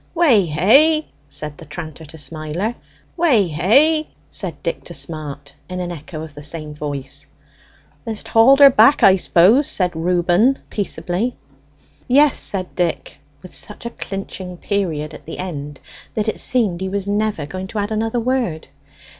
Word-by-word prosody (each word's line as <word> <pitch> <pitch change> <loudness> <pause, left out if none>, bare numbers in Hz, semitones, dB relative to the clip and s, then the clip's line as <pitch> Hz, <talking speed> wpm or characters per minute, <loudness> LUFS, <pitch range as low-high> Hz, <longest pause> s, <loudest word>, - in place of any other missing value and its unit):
"Weh 270 - +4
hey!" 275 - +4 0.2
said 145 +1 -7
the 165 - -11
tranter 160 0 -8
to 160 +2 -13
Smiler. 160 +8 -3 0.4
"Weh 305 - +4
hey!" 280 - +3 0.2
said - - -5
Dick - - -3
to - - -7
Smart, 145 -3 -5 0.2
in 180 0 -4
an 175 -1 -3
echo 155 -1 -7
of 160 -2 -10
the 145 - -10
same 150 0 -6
voice. 145 -2 -6 0.8
"Th'st 220 -2 -4
hauled 265 +5 +6
her 280 -1 +10
back, 230 +4 +5
I 190 - +8
suppose?" 200 - +3
Reuben 175 +2 +1
inquired 270 +4 +1
peaceably. 195 +3 -2 0.7
"Yes," 285 +2 +5
said 185 -2 -2
Dick, 175 -2 -2 0.2
with 185 - -12
such 210 - -5
a 235 - -4
clinching 190 -3 -6
period 165 -7 -2
at - - -12
the - - -6
end 145 -6 -6 0.4
that 215 0 -1
it 220 - -2
seemed 210 -9 0
he 190 - -2
was 200 0 -3
never 205 -6 -1
going 185 +6 -6
to 220 - -7
add 205 +1 -2
another 225 +2 -1
word. 235 -10 -2
185 Hz, 160 wpm, -19 LUFS, 155-225 Hz, 0.8 s, her